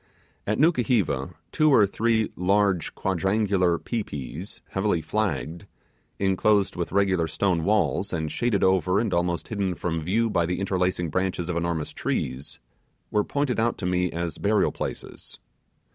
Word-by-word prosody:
At 105 - +1
Nukuheva, 115 - +1 0.2
two 155 -1 +3
or 110 -6 +6
three 110 +2 0
large 95 -1 +1
quadrangular 95 -1 +1
'pi 115 +5 -3
pis', 75 - -7
heavily 95 -3 0
flagged, 85 -2 -2 0.5
enclosed 100 +1 +2
with 85 -1 -3
regular 95 -3 +2
stone 85 +1 0
walls, 105 0 +1
and 80 -3 -2
shaded 120 -5 0
over 95 +1 +3
and 110 -1 -1
almost 85 -1 -1
hidden 100 -4 -1
from 85 -2 -2
view 105 +8 +1
by 85 -4 +1
the 90 +1 -2
interlacing 90 -3 0
branches 90 0 -1
of 90 - -1
enormous 85 -2 -2
trees, 65 +3 -3 0.5
were 105 - +2
pointed 140 -2 -1
out 115 +1 +1
to 95 - -5
me 90 0 +1
as 85 -2 -4
burial 105 +1 +2
places. - - -6
95 Hz, 145 wpm, -25 LUFS, 85-105 Hz, 0.5 s, or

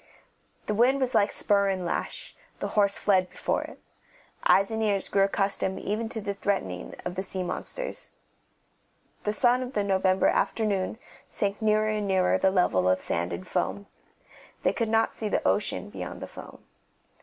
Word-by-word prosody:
The 210 - -1
wind 250 +6 +3
was 260 -1 +1
like 205 - +3
spur 200 -1 +2
and 185 -2 -2
lash; - - -4 0.2
the - - -3
horse 200 -2 +2
fled 185 -3 +2
before - - -1
it. - - -9 0.6
Eyes 195 +2 +4
and 220 0 -2
ears 205 -3 +1
grew 195 - +2
accustomed 195 -1 +1
even 220 +2 -2
to 225 - -4
the 200 -1 -3
threatening 140 - -2
of 180 - -2
the 190 - -2
sea 190 -1 -2
monsters. - - -3 1.2
The 210 - +2
sun 245 +3 +3
of 255 +1 -5
the 205 - +1
November 190 -1 +2
afternoon 210 -2 +1 0.3
sank 200 +1 -2
nearer 215 0 +3
and 210 -1 -1
nearer 190 -1 +2
the 190 - +4
level 95 - +2
of 95 - +3
sand 85 +1 -1
and 90 +2 -6
foam; 200 - -2 0.8
they - - +3
could 230 -2 -1
not 225 0 +2
see 215 - -3
the - - 0
ocean - - 0
beyond - - -6
the - - -6
foam. - - -12
200 Hz, 175 wpm, -27 LUFS, 190-215 Hz, 1.2 s, Eyes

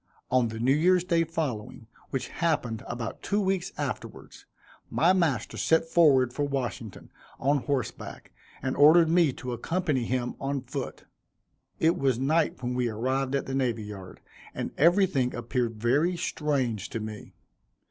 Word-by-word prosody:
On 125 -2 +3
the 110 0 -6
New 125 +4 +3
Year's 175 +4 +3
day 170 -2 +2
following, 150 -11 -4 0.2
which 135 - -3
happened 125 -10 -1
about 120 -1 -5
two 205 - 0
weeks 190 -3 -1
afterwards, - - -6 0.4
my 175 +3 +3
master 170 -8 0
set 160 0 +2
forward 140 -7 +4
for 145 - -4
Washington, 125 -7 -4 0.3
on 140 +2 +2
horseback, 140 -5 -4 0.3
and 130 - -1
ordered 160 +3 +6
me 170 -4 +4
to 125 -1 -6
accompany 145 0 -1
him 125 0 -1
on 140 0 -2
foot. 130 +1 -6 0.7
It 165 +2 +2
was 135 -3 +2
night 150 0 +1
when 125 +1 -1
we 125 -1 0
arrived 130 +5 -1
at 140 - -1
the 135 - -5
Navy 120 -5 0
Yard, 100 -3 -9 0.3
and - - -3
everything 170 -6 +3
appeared 120 0 -2
very 140 +11 +1
strange 130 - -1
to 115 - -4
me. 110 -1 -8
135 Hz, 150 wpm, -27 LUFS, 120-160 Hz, 0.7 s, ordered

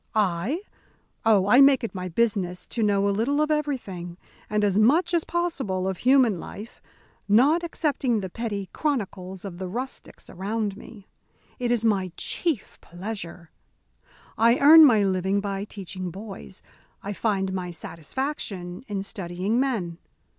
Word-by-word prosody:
"I? 210 - 0 0.6
Oh, 205 -4 +5
I 250 +6 +7
make 275 -2 +6
it 230 - -3
my 185 -1 -5
business 185 -2 0
to 235 - -4
know 200 -2 +2
a - - +2
little 245 +8 0
of 305 0 +1
everything, 210 - -3 0.3
and 210 0 +1
as 205 0 +2
much 320 +10 +3
as 335 -2 +2
possible 265 - -1
of 190 -1 -2
human 250 -7 +4
life, 215 +7 -9 0.5
not 275 +11 +4
excepting 285 -8 0
the 190 - -4
petty 205 -3 -4
chronicles 195 - -3
of 180 -3 -7
the 190 - -4
rustics 250 +8 -6
around 205 +2 -3
me. 205 -1 -13 0.5
It 245 -1 -1
is 235 -2 +1
my 195 -5 +1
chief 320 - -3
pleasure. 175 -2 -7 0.9
I 230 +2 +5
earn 310 +3 +9
my 220 -7 +5
living 190 +1 +1
by 200 0 -3
teaching 185 -3 -6
boys. 180 - -10 0.4
I 200 - -4
find 195 -3 -1
my 180 -1 -3
satisfaction 180 - -5
in 200 -3 -3
studying 190 +3 -2
men. 200 -11 -1
205 Hz, 145 wpm, -25 LUFS, 185-250 Hz, 0.9 s, earn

